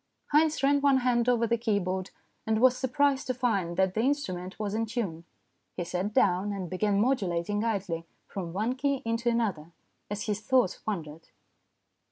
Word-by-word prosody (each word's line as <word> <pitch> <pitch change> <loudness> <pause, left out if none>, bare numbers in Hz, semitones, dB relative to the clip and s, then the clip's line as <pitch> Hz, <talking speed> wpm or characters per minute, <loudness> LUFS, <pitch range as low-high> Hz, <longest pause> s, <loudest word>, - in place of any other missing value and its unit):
Haynes 305 -1 +3
ran 285 +1 +4
one 280 -1 +5
hand 245 -1 +2
over 235 -2 +3
the 235 0 0
keyboard, 190 -5 -1 0.4
and 220 0 +2
was 255 +1 +5
surprised 275 +1 +1
to 255 - -1
find 200 -9 0
that 190 -1 +2
the 215 - -2
instrument 190 -9 -2
was 210 -2 -3
in 225 +1 -1
tune. 195 -8 -3 0.5
He 175 - -1
sat 180 +4 -2
down, 195 0 +2
and 190 -3 -5
began 200 +2 +1
modulating 205 -4 0
idly 185 -7 -2 0.2
from 180 -4 -6
one 215 +7 0
key 275 +1 -1
into 230 +1 0
another, 195 -9 -1 0.4
as 205 0 -3
his 210 -1 -2
thoughts 245 -4 +2
wandered. 165 -6 -5
215 Hz, 170 wpm, -28 LUFS, 185-245 Hz, 0.5 s, one